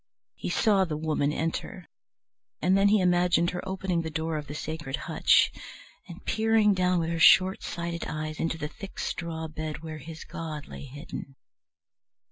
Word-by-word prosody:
He -, -, -5 dB
saw 200 Hz, +2 st, +3 dB
the 160 Hz, -5 st, -2 dB
Woman 155 Hz, -2 st, 0 dB
enter, 165 Hz, +2 st, -3 dB, 0.7 s
and 185 Hz, +2 st, +3 dB
then 195 Hz, +1 st, +5 dB
he 210 Hz, +1 st, +5 dB
imagined 175 Hz, -1 st, +3 dB
her 180 Hz, -, -4 dB
opening 190 Hz, -2 st, -1 dB
the 160 Hz, -, -4 dB
door 160 Hz, +1 st, -2 dB
of 150 Hz, -2 st, -4 dB
the 145 Hz, -, -6 dB
sacred 155 Hz, -3 st, -4 dB
hutch -, -, +3 dB, 0.6 s
and 175 Hz, +3 st, -11 dB
peering 220 Hz, -1 st, +3 dB
down 185 Hz, -1 st, +2 dB
with 165 Hz, -1 st, 0 dB
her 165 Hz, -, -2 dB
short 185 Hz, +3 st, +6 dB
sighted 170 Hz, -1 st, -4 dB
eyes 155 Hz, 0 st, -4 dB
into 165 Hz, 0 st, -1 dB
the 150 Hz, -2 st, -3 dB
thick 195 Hz, +5 st, -10 dB
straw 165 Hz, -2 st, -3 dB
bed 155 Hz, 0 st, -5 dB
where 155 Hz, -1 st, -6 dB
his 160 Hz, +2 st, -9 dB
god 155 Hz, -3 st, -6 dB
lay -, -, -9 dB
hidden. 140 Hz, 0 st, -8 dB
165 Hz, 170 wpm, -28 LUFS, 155-180 Hz, 0.7 s, short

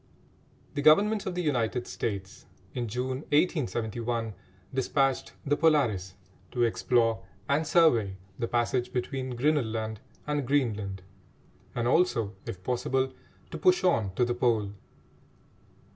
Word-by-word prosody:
The 145 Hz, -, -2 dB
Government 200 Hz, +8 st, +5 dB
of 185 Hz, -, -3 dB
the 180 Hz, -, -1 dB
United 125 Hz, -4 st, 0 dB
States, 95 Hz, -3 st, -5 dB, 0.3 s
in 120 Hz, -2 st, -2 dB
June 125 Hz, +4 st, -2 dB
1871, 120 Hz, -, 0 dB, 0.4 s
despatched 135 Hz, +1 st, +1 dB
the 145 Hz, +1 st, +2 dB
Polaris 120 Hz, -, +2 dB, 0.3 s
to 120 Hz, -, 0 dB
explore 115 Hz, -1 st, +2 dB, 0.2 s
and 145 Hz, +3 st, +1 dB
survey 120 Hz, -, +4 dB, 0.2 s
the 115 Hz, -, 0 dB
passage 120 Hz, +1 st, 0 dB
between 130 Hz, 0 st, -2 dB
Grinnel 145 Hz, +3 st, +2 dB
Land 110 Hz, -1 st, -3 dB, 0.3 s
and 145 Hz, -3 st, -1 dB
Greenland, 105 Hz, -9 st, 0 dB, 0.7 s
and 120 Hz, 0 st, 0 dB
also, 120 Hz, -, +2 dB
if 95 Hz, -1 st, -6 dB
possible, 130 Hz, +3 st, 0 dB, 0.4 s
to -, -, -5 dB
push 370 Hz, -1 st, +4 dB
on 110 Hz, -, +2 dB
to 125 Hz, -, +3 dB
the 120 Hz, -, 0 dB
Pole. 115 Hz, -5 st, +1 dB
125 Hz, 125 wpm, -28 LUFS, 110-145 Hz, 0.7 s, Government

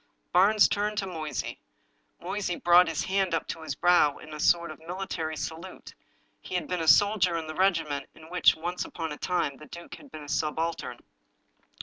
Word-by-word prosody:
Barnes 205 Hz, +3 st, +6 dB
turned 210 Hz, +1 st, -1 dB
to 200 Hz, -, 0 dB
Moysey. 160 Hz, -5 st, -5 dB, 0.6 s
Moysey 200 Hz, -3 st, -3 dB
brought 175 Hz, +1 st, +5 dB
his 165 Hz, -2 st, -2 dB
hand 190 Hz, -2 st, 0 dB
up -, -, -2 dB
to 165 Hz, -, -5 dB
his 155 Hz, -3 st, -4 dB
brow 175 Hz, -4 st, +4 dB
in 155 Hz, -, -11 dB
a 150 Hz, -, -7 dB
sort 170 Hz, +1 st, +2 dB
of 155 Hz, -, -11 dB
military 165 Hz, -2 st, -4 dB
salute 165 Hz, +5 st, -7 dB, 0.2 s
— -, -, -41 dB
he -, -, -6 dB
had 180 Hz, -, -1 dB
been 180 Hz, -2 st, -2 dB
a 160 Hz, -, -3 dB
soldier 195 Hz, -2 st, +4 dB
in 160 Hz, -, -4 dB
the 155 Hz, -, -6 dB
regiment 160 Hz, -6 st, 0 dB
in 160 Hz, -, -14 dB
which, 180 Hz, -2 st, +5 dB
once 175 Hz, +3 st, -3 dB
upon 160 Hz, -2 st, -5 dB
a 150 Hz, -, -6 dB
time, 170 Hz, -6 st, -1 dB
the 150 Hz, -, -13 dB
duke 170 Hz, 0 st, -10 dB
had 285 Hz, -, -12 dB
been 155 Hz, -, -9 dB
a -, -, -11 dB
subaltern. 160 Hz, +3 st, -2 dB
170 Hz, 200 wpm, -27 LUFS, 155-185 Hz, 0.6 s, Barnes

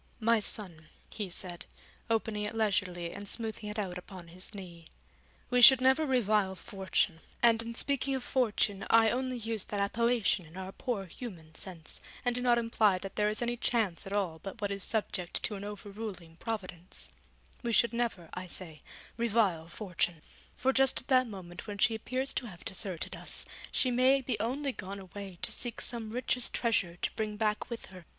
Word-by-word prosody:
'My 230 Hz, 0 st, +4 dB
son,' 180 Hz, -7 st, 0 dB, 0.2 s
he 210 Hz, -4 st, -4 dB
said, 180 Hz, 0 st, -2 dB, 0.4 s
opening 220 Hz, -2 st, 0 dB
it 210 Hz, +2 st, -2 dB
leisurely 185 Hz, -5 st, 0 dB
and 200 Hz, +1 st, -7 dB
smoothing 220 Hz, -2 st, -3 dB
it 210 Hz, -, -5 dB
out 185 Hz, -4 st, -2 dB
upon 180 Hz, -2 st, -11 dB
his 185 Hz, +5 st, -2 dB
knee, 175 Hz, -4 st, -9 dB, 0.7 s
'we 250 Hz, 0 st, +4 dB
should 260 Hz, +1 st, +11 dB
never 265 Hz, +4 st, +4 dB
revile 210 Hz, -7 st, +2 dB
Fortune, 190 Hz, -3 st, 0 dB, 0.2 s
and 230 Hz, -1 st, +6 dB
in 230 Hz, 0 st, -5 dB
speaking 275 Hz, +1 st, +2 dB
of 260 Hz, -, -3 dB
Fortune 215 Hz, -5 st, +1 dB
I 225 Hz, -1 st, +6 dB
only 255 Hz, 0 st, -1 dB
use 225 Hz, -2 st, -1 dB
that 205 Hz, -, -3 dB
appellation 225 Hz, -1 st, +2 dB
in 160 Hz, +4 st, -13 dB
our 190 Hz, 0 st, -5 dB
poor 220 Hz, -3 st, -3 dB
human 170 Hz, -5 st, -8 dB
sense, 165 Hz, -1 st, -5 dB, 0.2 s
and 245 Hz, -, +3 dB
do 245 Hz, -, -1 dB
not 245 Hz, -1 st, +4 dB
imply 225 Hz, -4 st, +3 dB
that 195 Hz, +1 st, -7 dB
there 210 Hz, 0 st, +3 dB
is 215 Hz, +3 st, 0 dB
any 240 Hz, 0 st, 0 dB
Chance 220 Hz, -7 st, 0 dB
at -, -, -7 dB
all 185 Hz, -6 st, 0 dB
but 195 Hz, +3 st, -7 dB
what 205 Hz, -2 st, -1 dB
is 200 Hz, -1 st, -2 dB
subject 195 Hz, -5 st, -1 dB
to 215 Hz, -, 0 dB
an 200 Hz, -1 st, -5 dB
over 205 Hz, 0 st, -7 dB
ruling 195 Hz, -6 st, -7 dB
Providence; 185 Hz, -6 st, -4 dB, 0.5 s
we 235 Hz, -, -1 dB
should 235 Hz, +1 st, +4 dB
never, 230 Hz, -8 st, -1 dB
I 185 Hz, 0 st, -5 dB
say, 165 Hz, -4 st, -4 dB, 0.4 s
revile 210 Hz, -8 st, +2 dB
Fortune, 175 Hz, -3 st, -2 dB, 0.3 s
for 265 Hz, +1 st, +2 dB
just 270 Hz, 0 st, +3 dB
at -, -, -23 dB
that 255 Hz, -1 st, +5 dB
moment 185 Hz, -2 st, -8 dB
when 205 Hz, -1 st, -5 dB
she 225 Hz, +3 st, +4 dB
appears 255 Hz, +4 st, -2 dB
to 245 Hz, -, -2 dB
have 180 Hz, -5 st, -11 dB
deserted 190 Hz, -3 st, -2 dB
us, -, -, -7 dB, 0.3 s
she 255 Hz, -, +4 dB
may 260 Hz, +3 st, +5 dB
be 240 Hz, -4 st, -2 dB
only 270 Hz, +6 st, -1 dB
gone 200 Hz, -4 st, -6 dB
away 195 Hz, -1 st, -8 dB
to -, -, +1 dB
seek 240 Hz, -2 st, 0 dB
some 230 Hz, -3 st, 0 dB
richest 250 Hz, +1 st, 0 dB
treasure 200 Hz, -7 st, +1 dB
to -, -, 0 dB
bring 215 Hz, -1 st, -2 dB
back 215 Hz, -1 st, 0 dB
with 235 Hz, -1 st, -5 dB
her. 180 Hz, -3 st, -12 dB
210 Hz, 190 wpm, -31 LUFS, 185-235 Hz, 0.7 s, should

